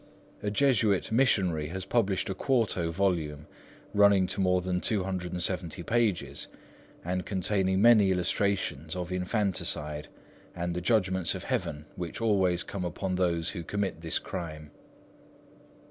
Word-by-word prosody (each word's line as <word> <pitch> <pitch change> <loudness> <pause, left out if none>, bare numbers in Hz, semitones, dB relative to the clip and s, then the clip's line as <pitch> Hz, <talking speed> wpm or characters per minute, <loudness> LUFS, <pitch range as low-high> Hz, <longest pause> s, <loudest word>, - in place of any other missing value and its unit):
A 105 - -1
Jesuit 110 -5 +2
missionary 95 - +2
has 95 +3 -5
published 100 -6 +1
a 95 - -2
quarto 105 -7 0
volume, 85 -5 -1 0.5
running 100 -2 +5
to 95 - -2
more 90 -1 +3
than 90 0 -2
270 90 -3 -1
pages, 115 -2 0 0.6
and 90 +1 -1
containing 95 +1 +1
many 110 -4 +7
illustrations 90 -4 0
of 90 0 -4
infanticide, 90 -6 -1 0.5
and 85 0 -2
the 90 - -3
judgments 95 -3 +1
of - - -6
Heaven 75 0 -3
which 85 -2 -5
always 95 -6 +2
come 100 -2 -5
upon 90 +2 -3
those 85 -2 0
who 90 - -5
commit 100 -2 -3
this 85 +1 0
crime. 80 -5 -6
95 Hz, 130 wpm, -29 LUFS, 85-100 Hz, 0.6 s, many